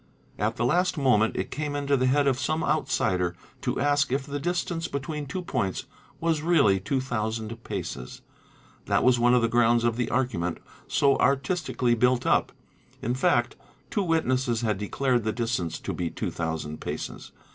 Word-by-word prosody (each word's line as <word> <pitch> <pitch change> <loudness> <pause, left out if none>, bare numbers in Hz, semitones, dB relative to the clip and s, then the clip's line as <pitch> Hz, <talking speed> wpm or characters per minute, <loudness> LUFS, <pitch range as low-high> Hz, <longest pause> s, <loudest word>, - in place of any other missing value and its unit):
At 110 +3 0
the 120 - 0
last 180 +7 +2
'moment 125 -6 +3
it - - -3
came 150 -1 -3
into 140 0 +1
the 130 -1 +2
head 140 +2 +3
of 135 -2 +2
some 155 +2 0
outsider 95 - +1 0.3
to - - -1
ask 145 -1 +2
if 135 +1 0
the 145 0 -4
distance 175 +1 -2
between 145 +1 -4
two 180 +7 -4
points 120 - -2 0.3
was 165 -2 +1
really 150 - +4
two 105 +8 -1
thousand 115 -2 -3
paces. 60 +1 -6 0.6
That - - +2
was 125 -1 +4
one 120 +1 +5
of 120 - +3
the - - +4
grounds 120 0 +3
of 120 -1 +1
the 120 -2 -1
argument 90 -10 -1 0.3
so 140 -1 +3
artistically 140 -2 +1
built 125 +1 +2
up: - - +2 0.5
in 120 - 0
fact 120 -1 +2 0.4
two 205 - +1
witnesses 130 - +1
'had 110 -4 0
declared 125 +3 0
the 110 - 0
distance 115 -8 -2
to - - -3
be 85 -2 -2
two - - -4
thousand 80 -2 -4
paces. - - -6
125 Hz, 175 wpm, -26 LUFS, 115-145 Hz, 0.6 s, one